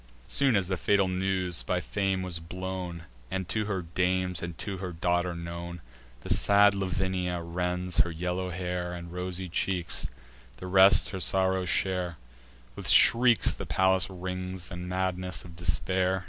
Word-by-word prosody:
Soon 135 Hz, -, +2 dB
as 95 Hz, -3 st, +1 dB
the 95 Hz, -1 st, -1 dB
fatal 100 Hz, +2 st, +2 dB
news 95 Hz, -2 st, -1 dB
by 90 Hz, -, -1 dB
Fame 95 Hz, 0 st, -1 dB
was 90 Hz, -2 st, -4 dB
blown, 90 Hz, 0 st, -5 dB, 0.3 s
And 95 Hz, -1 st, -3 dB
to 110 Hz, +2 st, -1 dB
her 95 Hz, -3 st, -2 dB
dames 90 Hz, +1 st, 0 dB
and 85 Hz, -1 st, -6 dB
to 100 Hz, -2 st, -5 dB
her 90 Hz, -1 st, -4 dB
daughter 90 Hz, +1 st, 0 dB
known, 85 Hz, +1 st, -6 dB, 0.4 s
The -, -, +1 dB
sad 100 Hz, 0 st, +5 dB
Lavinia 95 Hz, -2 st, -1 dB
rends 90 Hz, +1 st, -2 dB
her 85 Hz, -, +4 dB
yellow 90 Hz, +2 st, -3 dB
hair 90 Hz, 0 st, -3 dB
And 85 Hz, -1 st, -8 dB
rosy 90 Hz, +1 st, -4 dB
cheeks; 90 Hz, 0 st, -1 dB, 0.5 s
the -, -, -8 dB
rest 95 Hz, +1 st, +6 dB
her 95 Hz, -, -5 dB
sorrow 95 Hz, +1 st, +2 dB
share: 90 Hz, -2 st, 0 dB, 0.6 s
With -, -, -3 dB
shrieks 120 Hz, -1 st, +6 dB
the -, -, -7 dB
palace 95 Hz, -1 st, +2 dB
rings, 90 Hz, 0 st, -5 dB
and 90 Hz, 0 st, -6 dB
madness 90 Hz, 0 st, -2 dB
of 85 Hz, -2 st, -12 dB
despair. 90 Hz, +2 st, 0 dB
90 Hz, 155 wpm, -28 LUFS, 90-95 Hz, 0.6 s, rest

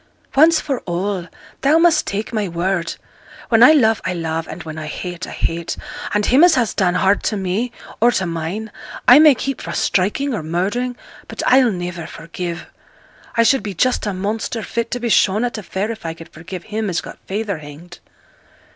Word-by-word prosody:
Once 320 Hz, +4 st, +6 dB
for 270 Hz, -4 st, -2 dB
all, 180 Hz, +1 st, -2 dB, 0.3 s
thou 290 Hz, +4 st, +4 dB
must 335 Hz, 0 st, +4 dB
take 210 Hz, +4 st, -3 dB
my 210 Hz, -3 st, 0 dB
word. 175 Hz, 0 st, -1 dB, 0.5 s
When 225 Hz, -1 st, +4 dB
I 255 Hz, +6 st, +9 dB
love 225 Hz, -7 st, +3 dB
I 180 Hz, -, -2 dB
love, 165 Hz, -1 st, -3 dB
and 170 Hz, -, -7 dB
when 155 Hz, -1 st, -7 dB
I 155 Hz, -, -6 dB
hate 175 Hz, +3 st, -6 dB
I -, -, -8 dB
hate; 165 Hz, 0 st, -3 dB, 0.3 s
and 210 Hz, 0 st, +1 dB
him 265 Hz, +6 st, +5 dB
as 355 Hz, -2 st, +7 dB
has 240 Hz, -5 st, +1 dB
done 180 Hz, -2 st, +1 dB
hard 195 Hz, +1 st, +3 dB
to 215 Hz, -, 0 dB
me, 195 Hz, +6 st, -1 dB, 0.3 s
or 240 Hz, +2 st, +5 dB
to 190 Hz, -, 0 dB
mine, 170 Hz, +6 st, -4 dB, 0.4 s
I 250 Hz, +4 st, +9 dB
may 305 Hz, -3 st, +7 dB
keep 270 Hz, +2 st, -4 dB
fra' -, -, -5 dB
striking 215 Hz, +9 st, 0 dB
or 220 Hz, -, -2 dB
murdering, 200 Hz, +10 st, -2 dB, 0.3 s
but -, -, -5 dB
I'll 255 Hz, -1 st, +5 dB
niver 175 Hz, -4 st, -4 dB
forgive. 170 Hz, +1 st, -6 dB, 0.7 s
I 230 Hz, -, +4 dB
should 270 Hz, +2 st, +3 dB
be 205 Hz, -2 st, -6 dB
just 250 Hz, +1 st, +1 dB
a 205 Hz, -, -1 dB
monster, 215 Hz, +3 st, -3 dB
fit 235 Hz, +1 st, -3 dB
to 245 Hz, -, -3 dB
be 235 Hz, -1 st, -2 dB
shown 210 Hz, +1 st, +3 dB
at 240 Hz, -2 st, -2 dB
a -, -, -6 dB
fair, 200 Hz, +2 st, -3 dB
if 225 Hz, -, -8 dB
I 165 Hz, -1 st, -4 dB
could 165 Hz, 0 st, -12 dB
forgive 175 Hz, +2 st, -9 dB
him 215 Hz, -1 st, -3 dB
as 175 Hz, -, 0 dB
got -, -, -10 dB
feyther 200 Hz, -3 st, -2 dB
hanged.' 155 Hz, +4 st, -12 dB
200 Hz, 200 wpm, -19 LUFS, 175-235 Hz, 0.7 s, I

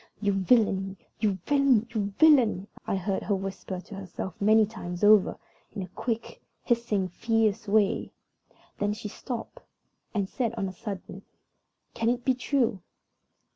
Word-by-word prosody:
"You 205 Hz, -2 st, +1 dB
villain! 195 Hz, -1 st, +2 dB, 0.2 s
you 205 Hz, -4 st, +1 dB
villain! 275 Hz, -6 st, +4 dB
you 205 Hz, -3 st, -1 dB
villain!" 255 Hz, -, +5 dB, 0.2 s
I -, -, +1 dB
heard 190 Hz, +1 st, -1 dB
her 205 Hz, -, 0 dB
whisper 190 Hz, -1 st, -5 dB
to 200 Hz, -, -13 dB
herself 190 Hz, -1 st, -6 dB
many 215 Hz, +1 st, +5 dB
times 180 Hz, -4 st, -7 dB
over, 210 Hz, -2 st, +6 dB, 0.4 s
in 195 Hz, -, -3 dB
a -, -, -7 dB
quick, 230 Hz, +4 st, -4 dB, 0.2 s
hissing, 230 Hz, -5 st, +1 dB
fierce 225 Hz, +2 st, 0 dB
way. 205 Hz, -1 st, +2 dB, 0.7 s
Then 205 Hz, 0 st, +1 dB
she 215 Hz, 0 st, -6 dB
stopped, 245 Hz, -, -6 dB, 0.5 s
and 200 Hz, -3 st, -1 dB
said 235 Hz, +2 st, -2 dB
on 200 Hz, -4 st, -2 dB
a 185 Hz, -, -6 dB
sudden, 195 Hz, -3 st, -7 dB, 0.7 s
"Can 230 Hz, 0 st, 0 dB
it 245 Hz, 0 st, -1 dB
be 260 Hz, -, +4 dB
true?" 240 Hz, -5 st, 0 dB
210 Hz, 145 wpm, -27 LUFS, 195-230 Hz, 0.7 s, over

